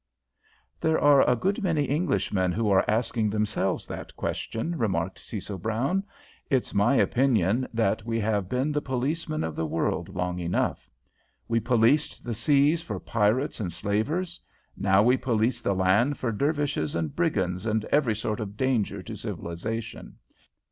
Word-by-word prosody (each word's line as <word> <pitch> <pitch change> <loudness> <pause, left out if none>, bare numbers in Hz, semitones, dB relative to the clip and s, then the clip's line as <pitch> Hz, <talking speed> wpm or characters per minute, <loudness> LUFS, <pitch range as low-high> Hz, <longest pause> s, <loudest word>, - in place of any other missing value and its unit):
"There 160 0 +2
are 145 -2 +6
a 125 - +4
good 195 - -1
many 160 -7 +1
Englishmen 115 - 0
who 110 0 0
are 95 - +5
asking 110 0 +1
themselves 105 -2 -1
that - - -8
question," 160 +10 -3
remarked 95 - -1
Cecil 100 -2 -6
Brown. 120 - 0 0.5
"It's 130 -4 0
my 100 +7 +3
opinion 120 -3 +2
that 110 -4 0
we 115 0 -1
have 105 -3 0
been 130 +4 0
the 150 0 0
policemen 150 +5 -2
of 80 -1 -3
the 80 - -2
world 85 +3 -1
long 90 -1 -3
enough. 85 0 -1 0.6
We 115 0 +2
policed 120 +4 +2
the 120 - -3
seas 145 +7 +3
for 170 - -5
pirates 115 +6 0
and 95 -5 -2
slavers. 150 - -2 0.3
Now 95 +1 +3
we 125 +3 +4
police 120 -1 0
the 100 - 0
land 100 +10 +3
for 120 - -1
Dervishes 140 - -1
and 80 -2 -2
brigands 95 - 0
and 110 0 0
every 135 -7 +3
sort 105 0 -3
of 105 -1 -6
danger 130 -5 0
to - - -7
civilisation. 110 +7 -5
115 Hz, 155 wpm, -26 LUFS, 100-140 Hz, 0.6 s, are